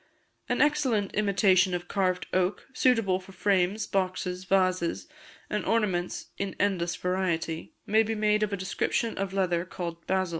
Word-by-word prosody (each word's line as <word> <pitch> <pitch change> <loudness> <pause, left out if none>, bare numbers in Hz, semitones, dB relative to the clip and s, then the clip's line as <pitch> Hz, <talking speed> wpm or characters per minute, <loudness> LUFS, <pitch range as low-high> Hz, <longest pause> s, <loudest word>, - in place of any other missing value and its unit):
An - - +3
excellent 260 -9 +1
imitation 195 -3 +3
of 175 0 -5
carved 185 -2 0
oak, 185 +1 0
suitable 225 -8 +2
for 190 +1 -14
frames, 195 +1 +1
boxes, 185 -1 -2
vases, 185 - +1 0.4
and 210 - -2
ornaments 190 -6 -1
in 195 -1 -3
endless 180 -4 +1
variety, 170 -3 -2
may 220 +2 +4
be 225 0 -1
made 210 0 +2
of 210 -1 0
a 200 - -1
description 190 +4 -1
of 195 -1 -2
leather 180 -3 +1
called 170 -2 -6
basil. 190 -1 +1
190 Hz, 150 wpm, -28 LUFS, 180-210 Hz, 0.4 s, may